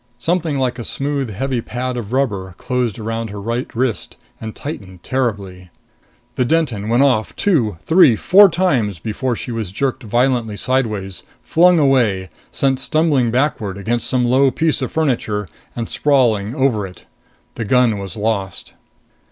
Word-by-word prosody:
Something 160 +2 0
like 125 -2 -1
a - - -4
smooth, 140 0 -2
heavy 125 +4 -2
pad 125 +3 -4
of 115 -3 -5
rubber 100 -9 -1
closed 125 -5 -2
around 115 0 -4
her 100 0 -7
right 115 +5 -3
wrist 125 -1 -2 0.2
and 110 -1 -6
tightened 95 - -8
terribly. 100 -8 -3 0.7
The 125 - +3
Denton 125 -8 0
went 120 +4 +4
off, 125 -6 +1
two, 120 - +1
three, 160 -8 +6
four 195 - +6
times 135 - 0
before 115 +7 -2
she 120 - -6
was 110 -5 -4
jerked 130 +6 -2
violently 120 -1 0
sideways, 110 -8 -1 0.2
flung 175 +2 +4
away, 115 - +2 0.2
sent 135 -1 +1
stumbling 145 -3 +2
backward 115 -6 -1
against 115 +4 -2
some 125 -1 +1
low 130 +3 +4
piece 155 +3 0
of 130 - -3
furniture 115 -9 -1 0.3
and, 115 -2 -3
sprawling, 120 -6 +1
over 120 -7 +1
it. 90 -1 -15 0.5
The 115 - -4
gun 120 -2 +3
was 95 -1 -7
lost. 105 -3 -3
120 Hz, 150 wpm, -18 LUFS, 105-135 Hz, 0.7 s, three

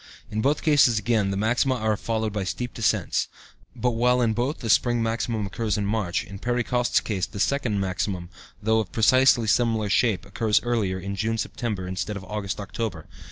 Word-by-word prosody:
In 110 +1 -1
both 145 +5 +1
cases, 145 -7 +4
again, 110 -2 +1
the 100 - -2
maxima 120 +5 +1
are 110 -2 0
followed 110 0 -2
by 105 -2 -2
steep 120 +6 -4
descents, 115 - 0 0.5
but 125 - 0
while 125 +2 +2
in 115 -2 +2
both 125 +6 -1
the 115 - -5
spring 120 +1 +3
maximum 115 -1 -1
occurs 105 +1 -2
in 105 - -1
March, 100 -4 -1
in 100 0 -10
Perry 120 +2 0
Coste's 125 0 +1
case 95 -5 -2
the 100 - -8
second 125 -4 0
maximum, 95 -2 -2 0.3
though 110 +1 +2
of 100 -6 -3
precisely 120 +1 +4
similar 110 -1 +1
shape, 105 -1 +2
occurs 105 +2 +1
earlier, 110 -6 0
in 100 +2 -5
June 110 +2 -1
September 105 -4 -3
instead 95 +3 -3
of 100 - -8
August 100 +1 -4
October. 100 -5 -4
110 Hz, 190 wpm, -25 LUFS, 100-120 Hz, 0.5 s, cases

